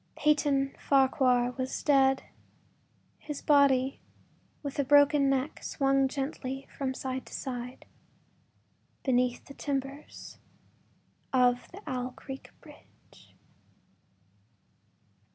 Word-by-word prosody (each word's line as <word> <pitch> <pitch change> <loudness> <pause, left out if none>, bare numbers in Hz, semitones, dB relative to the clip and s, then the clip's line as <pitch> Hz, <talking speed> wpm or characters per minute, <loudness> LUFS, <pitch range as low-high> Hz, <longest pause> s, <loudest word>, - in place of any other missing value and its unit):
Peyton 285 -2 +2
Farquhar 260 -3 +3
was 260 0 -3
dead; 270 -2 +4 1.0
his 295 -2 -6
body, 275 -2 +4 0.6
with 285 0 -5
a - - +4
broken 285 0 +5
neck, 270 +1 -1
swung 275 -1 +2
gently 270 -1 -4
from 265 -2 -2
side 260 0 -4
to - - -8
side 250 -1 -6 1.2
beneath 250 -2 +1
the 275 - -11
timbers 275 0 -5 0.9
of 250 -1 +2
the 390 +4 -11
Owl 255 -3 -3
Creek 270 -1 -9
bridge. - - -19
270 Hz, 95 wpm, -29 LUFS, 255-280 Hz, 1.2 s, broken